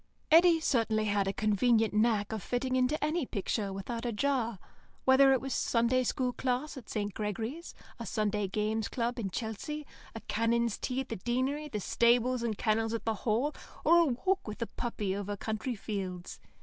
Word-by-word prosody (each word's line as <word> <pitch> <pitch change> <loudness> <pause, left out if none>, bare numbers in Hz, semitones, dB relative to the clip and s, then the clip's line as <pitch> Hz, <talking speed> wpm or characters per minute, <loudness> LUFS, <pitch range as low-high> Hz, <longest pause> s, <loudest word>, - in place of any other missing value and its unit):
Eddy 335 +1 +7
certainly 225 -7 +1
had 205 -2 +1
a - - +1
convenient 220 +2 +2
knack 215 -1 +2
of 220 -2 -3
fitting 255 +5 -1
into 255 +4 +2
any 310 +2 +1
picture 205 -3 -2
without 215 +5 -5
a 240 - -1
jar, 235 -1 0 0.5
whether 270 +1 +6
it 265 - +4
was 270 +1 -4
a - - -1
Sunday 240 +2 +2
School 250 0 -1
class 255 +4 -2
at 255 -5 -10
St. 205 -2 -2
Gregory's, 225 - -4 0.2
a 230 - -5
Sunday 210 -2 0
Games 215 +2 -1
Club 240 0 -2
in 200 -4 -2
Chelsea, 235 +9 -4 0.3
a 225 - -6
canons' 230 0 0
tea 260 0 -1
at 265 - -8
the 225 - -3
Deanery, 260 +8 -1
the 210 - -3
stables 240 +4 +2
and 225 -3 -2
kennels 225 0 +1
at 230 - -5
the 225 - +1
Hall, 235 +7 0 0.3
or 340 - +7
a 340 - +5
walk 345 +8 0
with 215 - -6
a - - -5
puppy 210 -5 -2
over 205 0 -4
country 220 +4 -3
fields. 190 -4 -5
230 Hz, 190 wpm, -31 LUFS, 215-255 Hz, 0.5 s, Eddy